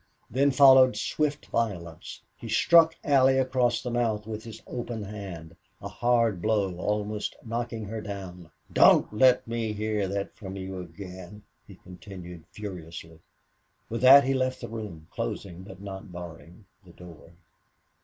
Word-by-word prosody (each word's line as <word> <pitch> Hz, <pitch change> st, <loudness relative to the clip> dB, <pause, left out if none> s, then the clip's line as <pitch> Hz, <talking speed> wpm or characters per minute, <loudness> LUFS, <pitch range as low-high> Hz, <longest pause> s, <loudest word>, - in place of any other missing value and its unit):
Then 135 Hz, +5 st, +3 dB
followed 130 Hz, -1 st, +6 dB
swift 150 Hz, -1 st, -1 dB
violence. 90 Hz, -8 st, -4 dB
He 115 Hz, -, -9 dB
struck 165 Hz, +8 st, +5 dB
Allie 135 Hz, -3 st, +4 dB
across 125 Hz, -2 st, +1 dB
the 125 Hz, -, -4 dB
mouth 115 Hz, -3 st, -1 dB
with 110 Hz, 0 st, -6 dB
his 115 Hz, -1 st, -10 dB
open 120 Hz, -3 st, -5 dB
hand, 95 Hz, -6 st, -8 dB, 0.2 s
a -, -, -7 dB
hard 115 Hz, -6 st, +1 dB
blow, 100 Hz, -4 st, 0 dB
almost 105 Hz, +2 st, -2 dB
knocking 115 Hz, -1 st, -4 dB
her 110 Hz, +2 st, -5 dB
down. 95 Hz, -5 st, -8 dB, 0.2 s
"Don't -, -, +5 dB
let 125 Hz, +3 st, +4 dB
me 115 Hz, -2 st, -2 dB
hear 105 Hz, -1 st, -1 dB
that 100 Hz, +1 st, -4 dB
from 95 Hz, -2 st, -8 dB
you 95 Hz, -1 st, -6 dB
again!" 90 Hz, +3 st, -10 dB, 0.2 s
he -, -, -13 dB
continued, 90 Hz, -2 st, -11 dB
furiously. 85 Hz, -5 st, -9 dB, 0.7 s
With 115 Hz, 0 st, -4 dB
that 135 Hz, +2 st, +9 dB
he 135 Hz, +1 st, 0 dB
left 130 Hz, -1 st, -1 dB
the -, -, -6 dB
room, 105 Hz, -9 st, -7 dB
closing 90 Hz, -3 st, -5 dB
but 95 Hz, 0 st, -12 dB
not 95 Hz, -1 st, -8 dB
barring 85 Hz, +2 st, -11 dB, 0.2 s
the 90 Hz, -2 st, -17 dB
door. 85 Hz, -2 st, -14 dB
105 Hz, 145 wpm, -27 LUFS, 90-120 Hz, 0.7 s, that